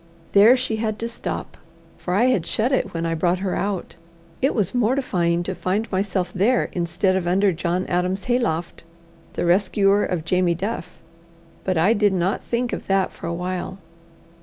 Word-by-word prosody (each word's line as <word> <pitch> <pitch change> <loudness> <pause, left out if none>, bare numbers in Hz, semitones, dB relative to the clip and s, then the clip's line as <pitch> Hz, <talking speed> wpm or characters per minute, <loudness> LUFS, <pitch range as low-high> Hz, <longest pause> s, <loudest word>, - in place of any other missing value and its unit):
There 215 +6 +7
she 250 -3 -2
had 215 -1 -2
to 230 - -3
stop, 235 - -5 0.4
for 180 - -3
I 215 - +3
had 250 -9 +2
shut 230 +5 0
it 265 - 0
when 165 0 -3
I 165 - 0
brought 175 +2 +1
her 190 0 -2
out. 195 -4 -3 0.4
It 270 - +2
was 195 -4 0
mortifying 215 -9 +1
to 185 - -3
find 195 +5 -2
myself 185 -2 -1
there 225 +7 +2
instead 175 +2 0
of 185 -2 -1
under 195 +2 +3
John 175 +2 -1
Adam's 180 +2 -1
hayloft, 175 -12 -1 0.5
the - - -2
rescuer 195 +3 +3
of 165 -3 -2
Jamie 180 0 +2
Duff. 185 -1 -5 0.7
But 185 -2 0
I 185 +8 +4
did 205 -3 +2
not 185 +1 0
think 240 +1 -2
of - - -5
that 195 -1 +1
for - - -8
a 170 - -2
while. 180 +1 -4
190 Hz, 180 wpm, -22 LUFS, 175-215 Hz, 0.7 s, There